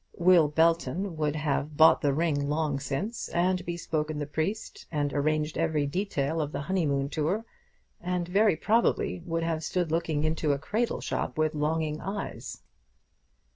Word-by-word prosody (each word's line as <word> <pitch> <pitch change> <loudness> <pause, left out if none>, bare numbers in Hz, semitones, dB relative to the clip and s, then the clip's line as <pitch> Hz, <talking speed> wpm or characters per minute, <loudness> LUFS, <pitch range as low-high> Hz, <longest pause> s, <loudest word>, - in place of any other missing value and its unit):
Will 175 -3 +6
Belton 165 +4 +1
would 150 -1 0
have 150 -1 -1
bought 160 0 +7
the 145 - +2
ring 145 -1 0
long 150 -2 0
since, 170 - -3
and 180 +1 +1
bespoken 155 -3 -2
the 145 - -2
priest, 160 +9 -4
and 145 -2 -1
arranged 150 +1 0
every 160 -3 +1
detail 160 -2 -1
of 150 -1 -3
the - - -3
honeymoon 140 -4 0
tour, 160 +9 -1 0.6
and 180 -1 -2
very 200 +1 +3
probably 215 0 +1
would 165 0 -1
have 165 -1 -1
stood 175 -2 -1
looking 160 -2 0
into 155 -1 +1
a - - -1
cradle 220 +11 -1
shop - - -3
with 155 0 +1
longing 155 0 -1
eyes. 195 +2 -5
160 Hz, 155 wpm, -28 LUFS, 150-175 Hz, 0.6 s, bought